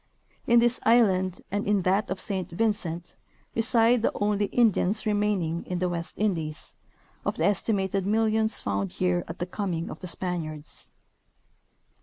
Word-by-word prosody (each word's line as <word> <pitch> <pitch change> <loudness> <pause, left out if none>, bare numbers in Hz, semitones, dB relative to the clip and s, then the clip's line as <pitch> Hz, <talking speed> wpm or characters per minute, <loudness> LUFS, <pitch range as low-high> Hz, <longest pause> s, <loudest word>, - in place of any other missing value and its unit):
In 235 -2 +5
this 240 +1 +3
island, 190 -6 +3
and 205 +1 -1
in 205 -2 +2
that 195 +4 +1
of 190 - -3
Saint 190 -3 -2
Vincent, 175 -3 -2 0.4
reside 230 0 +3
the - - +2
only 205 0 +1
Indians 220 -3 +2
remaining 205 -6 0
in 180 - -2
the 180 0 0
West 170 -1 -2
indies, 165 -8 -2 0.5
of - - -2
the. - - +1
estimated 195 -1 +1
millions 220 +1 +2
found 100 -1 -2
here 180 -1 0
at 165 - -7
the 175 - -2
coming 180 -3 -3
of - - -8
the 185 - -6
Spaniards. 165 -4 -3
195 Hz, 150 wpm, -27 LUFS, 175-215 Hz, 0.5 s, In